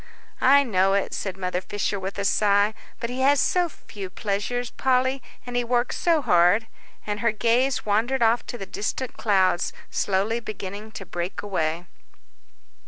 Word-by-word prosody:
"I 280 +2 +6
know 195 -5 +2
it," 200 - -1
said 190 -2 -4
Mother 180 -1 -2
Fisher, 205 +1 -2
with 190 +1 -5
a 200 - -2
sigh, 205 +1 +3 0.3
"but 235 - -3
he 255 - -4
has 275 +2 +4
so 355 -1 +2
few 200 -9 -9
pleasures, 215 +5 -2
Polly, 260 +1 +1 0.2
and 245 0 -6
he 245 - +2
works 240 +1 0
so 330 -4 +2
hard." 180 +4 +4 0.4
And 210 0 -3
her 230 -1 +2
gaze 240 +4 +1
wandered 230 +5 +1
off 230 +1 +3
to 240 - -5
the 195 - -6
distant 235 +6 -3
clouds, 190 -4 +2 0.2
slowly 205 +4 0
beginning 210 -1 -7
to 195 - -7
break 175 +3 -4
away. 170 -4 -1
215 Hz, 165 wpm, -24 LUFS, 195-245 Hz, 0.4 s, I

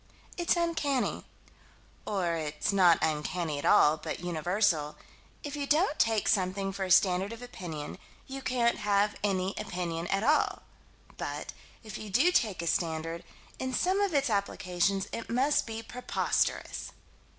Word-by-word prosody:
It's 345 0 +2
uncanny 320 -6 0 0.8
or 185 -5 0
it's 155 +2 -2
not 180 -4 +6
uncanny 155 0 -1
at - - -5
all, 150 +1 +5
but - - -5
universal 175 -2 0 0.5
if 290 0 -5
you 285 -1 -3
don't 310 +2 +2
take 225 -2 +2
something 195 0 +1
for 195 0 -3
a - - -6
standard 190 +2 +4
of 230 +1 -8
opinion, 165 -11 -7 0.3
you 270 0 -7
can't 240 -2 +1
have 205 0 +2
any 190 -1 0
opinion 170 -2 -3
at 195 +3 0
all: 300 +5 +2 0.5
but, - - -5 0.3
if 215 -3 -7
you 215 - -7
do 265 - +4
take 210 - +1
a - - -3
standard, 165 0 -1 0.4
in 260 -1 -2
some 375 +7 +2
of 395 -6 +1
its 275 -4 +2
applications 195 -1 0
it 230 - -6
must 265 +4 +2
be 225 0 -5
preposterous. 250 +2 -1
200 Hz, 150 wpm, -30 LUFS, 175-250 Hz, 0.8 s, not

